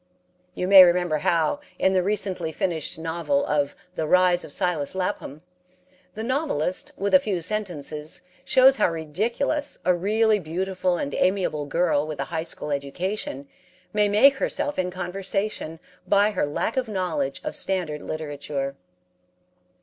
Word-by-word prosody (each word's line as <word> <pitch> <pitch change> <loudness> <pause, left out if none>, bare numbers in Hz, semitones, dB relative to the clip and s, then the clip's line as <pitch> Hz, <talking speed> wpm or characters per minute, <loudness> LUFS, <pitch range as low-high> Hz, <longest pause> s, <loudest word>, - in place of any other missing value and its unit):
You 180 - -2
may 190 -1 +10
remember 175 -3 +2
how, 165 - +1 0.2
in 190 - +2
the 185 - +3
recently 190 -4 -1
finished 160 -2 -2
novel 170 - -1
of 145 - 0 0.2
"The 160 -3 -2
Rise 180 0 +4
of - - -9
Silas 175 -3 0
Lapham," 180 -6 -3 0.7
the 220 - -4
novelist, 250 - -1
with 200 +1 -2
a 280 - +9
few 210 -9 -2
sentences, 160 -6 -4 0.2
shows 265 0 +5
how - - +3
ridiculous 220 - -1
a 180 - +4
really 215 +4 +2
beautiful 185 +2 -1
and 140 -3 -3
amiable 185 -6 0
girl 155 -1 +1
with 155 -2 -6
a 140 - -1
high 160 - 0
school 150 - -3
education 140 +1 -3 0.5
may 210 -1 +3
make 265 +7 +5
herself 290 -2 -1
in 180 0 0
conversation 185 -1 -3 0.3
by 205 +1 +4
her 185 -7 -1
lack 185 - -2
of 255 -2 0
knowledge 180 -9 -2
of - - -4
standard 170 -6 0
literature. 145 -3 -4
180 Hz, 145 wpm, -24 LUFS, 155-205 Hz, 0.7 s, may